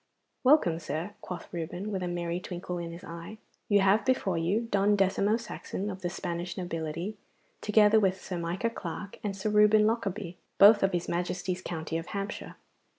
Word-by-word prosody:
'Welcome, 255 - +5
sir,' 165 +5 -4
quoth 180 - -7
Reuben, 175 +5 -4
with 190 -2 -2
a 180 - -2
merry 175 0 -2
twinkle 180 0 -5
in 170 -1 -5
his 170 +1 -10
eye. 170 +6 -8 0.3
'You 205 -1 +5
have 200 +2 +4
before 230 -8 +1
you 190 +8 0
Don 205 +1 +4
Decimo 200 +2 +2
Saxon 210 -3 -5
of 190 0 -8
the 175 - -1
Spanish 175 +1 -4
nobility, 170 +2 -4 0.4
together 210 +1 +5
with 190 -2 +1
Sir 180 -1 -5
Micah 175 +7 -1
Clarke 200 0 -6
and 200 -2 -3
Sir 210 +2 -1
Reuben 210 0 +6
Lockarby, 200 -5 -1 0.2
both 205 +1 +8
of 195 -1 +2
his 175 -1 -1
Majesty's 180 +1 -2
county 165 -2 -3
of 165 - -8
Hampshire. 200 0 -5
185 Hz, 175 wpm, -29 LUFS, 175-210 Hz, 0.4 s, both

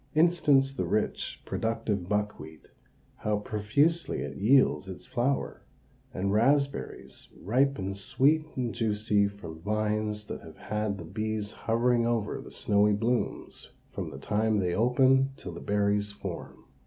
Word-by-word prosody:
Instance 150 -5 +4
the - - -2
rich, 110 - -1
productive 110 -5 -2
buckwheat, 105 -7 -3 0.5
how 105 -1 0
profusely 110 +11 +1
it - - -5
yields 110 -2 +3
its 95 - -8
flower; 130 +3 -1 0.5
and 100 +1 -1
raspberries 125 - 0
ripen 120 -3 +1
sweet 135 +10 +2
and 125 -3 -2
juicy 105 -2 +2
from 85 -6 -9
vines 105 +1 -1
that - - -6
have - - -12
had 105 -1 -2
the 85 - -8
bees 110 +3 -3
hovering 115 +1 +1
over 115 -3 -1
the - - -11
snowy 105 +1 +2
blooms 115 +4 -2 0.2
from - - -4
the - - -9
time 110 +1 +1
they 90 -3 0
open 130 +5 +4
till 90 - -7
the 85 - -8
berries 105 0 +1
form. 100 - -7
105 Hz, 135 wpm, -29 LUFS, 100-125 Hz, 0.5 s, Instance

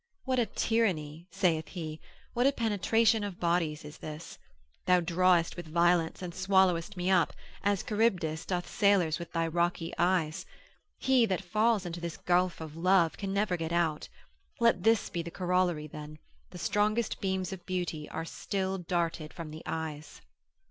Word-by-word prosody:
What 260 -1 +1
a 235 - +2
tyranny 175 -8 -1
(saith 175 -5 +1
he), 160 -4 -6 0.3
what 245 +2 +3
a - - +5
penetration 225 -1 +2
of 200 -3 -5
bodies 170 -3 0
is 150 - -10
this! 155 +1 -8 0.5
thou 180 0 +6
drawest 175 0 +2
with 175 -2 -7
violence, 170 +1 +2
and 175 -1 -5
swallowest 190 0 +2
me 180 +1 0
up, 175 -4 +3 0.3
as 200 -1 +1
Charybdis 185 -8 0
doth 180 -2 -2
sailors 190 -6 +2
with 170 - -7
thy 165 -1 0
rocky 170 0 -1
eyes: 170 -3 +1 0.5
he 260 -3 +3
that 190 -1 -1
falls 215 +2 +2
into 170 0 -5
this 170 -2 -5
gulf 180 0 +1
of 155 -1 -7
love, 175 -1 +3
can 195 -1 -4
never 200 -1 +1
get 165 -1 -4
out. 170 -3 0 0.5
Let 230 -6 +4
this 225 +2 +3
be 170 - -2
the 170 - -6
corollary 180 -3 0
then, 150 0 -9 0.3
the 180 - -10
strongest 210 +5 0
beams 190 -1 -1
of 180 -2 -9
beauty 175 -5 -3
are 165 - -4
still 190 +2 -3
darted 170 -3 -2
from 165 -3 -8
the 155 +1 -8
eyes. 160 -2 -5
180 Hz, 165 wpm, -30 LUFS, 165-195 Hz, 0.5 s, thou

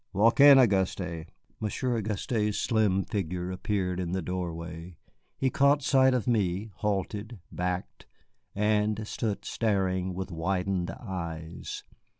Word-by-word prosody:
"Walk 110 +6 +3
in, 140 -1 +10
Auguste." 95 -7 +1 0.3
Monsieur 120 +4 -1
Auguste's 105 0 -1
slim 105 -4 +2
figure 90 -2 -3
appeared 95 -2 -1
in 90 -1 -2
the 95 - 0
doorway. 85 -1 -5 0.4
He 130 -1 +1
caught 140 +1 +3
sight 130 -1 +4
of 120 -6 -1
me, 105 -2 0
halted, 105 +2 -2
backed, 90 0 -4 0.5
and 105 +1 +1
stood 110 -3 -3
staring 95 -4 0
with 95 +1 -5
widened 90 +1 -1
eyes. 85 -5 -6
95 Hz, 120 wpm, -28 LUFS, 90-110 Hz, 0.5 s, in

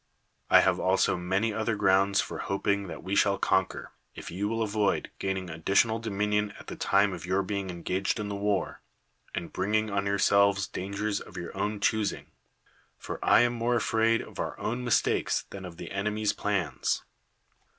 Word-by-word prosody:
I - - +8
have - - +2
also 95 +1 +2
many 95 +5 0
other 110 +1 -1
grounds 95 0 +3
for - - -6
hoping 100 0 -1
that - - -8
we 95 +2 -2
shall 100 -1 +3
conquer, 95 -1 0 0.2
if - - -8
you 100 +4 -2
will 115 +1 0
avoid 105 -1 0
gaining 95 -1 -2
additional 100 +7 +2
dominion 105 -1 -1
at - - -12
the - - -7
time 100 0 +2
of 85 -3 -7
your 95 +1 +1
being 100 0 -3
engaged 90 +3 -2
in 105 - -3
the 100 - -4
war, 100 -2 -1 0.5
and - - -5
bringing 105 +3 0
on 100 0 0
yourselves 100 0 +3
dangers 100 +2 -3
of 95 - -11
your 85 +1 -6
own 105 +2 -2
choosing; 110 0 -1 0.7
for - - -7
I - - +6
am 120 0 +2
more 120 +1 0
afraid 115 0 +2
of - - -12
our - - -3
own 120 +3 -2
mistakes 120 -3 +1
than 95 -1 -7
of 85 -2 -9
the - - -8
enemy's 105 +1 0
plans. 90 -10 -1
100 Hz, 175 wpm, -28 LUFS, 95-105 Hz, 0.7 s, I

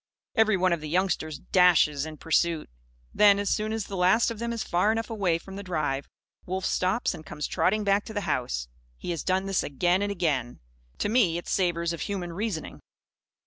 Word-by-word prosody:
Every 220 -3 +3
one 185 -1 +2
of 170 - -2
the 155 - -6
youngsters 165 -3 0
dashes 160 -5 +3
in 155 -1 -8
pursuit. 165 - 0 0.4
Then, 205 -1 +6
as 205 0 -1
soon 215 0 0
as 220 -1 -2
the 200 - -6
last 190 +6 +3
of 225 - -7
them 235 0 -2
is 230 -1 -2
far 180 +5 +2
enough 225 +1 -2
away 195 -7 +1
from 190 +3 -10
the - - -5
drive, 150 -7 -2 0.4
Wolf 185 +1 -2
stops 190 +6 0
and 155 - -9
comes 150 -1 -5
trotting 215 +3 +1
back 200 0 +2
to 220 - -8
the 205 - 0
house. - - -2 0.3
He - - -5
has 165 - -3
done 190 +1 0
this, 195 -1 +1
again 175 +6 +1
and 205 0 -1
again. 150 -10 -1 0.4
To - - -1
me, 210 -8 +3
it 175 - -7
savours 170 -2 0
of 170 - -6
human 185 -4 -4
reasoning. 195 -3 -4
185 Hz, 205 wpm, -27 LUFS, 165-205 Hz, 0.4 s, Then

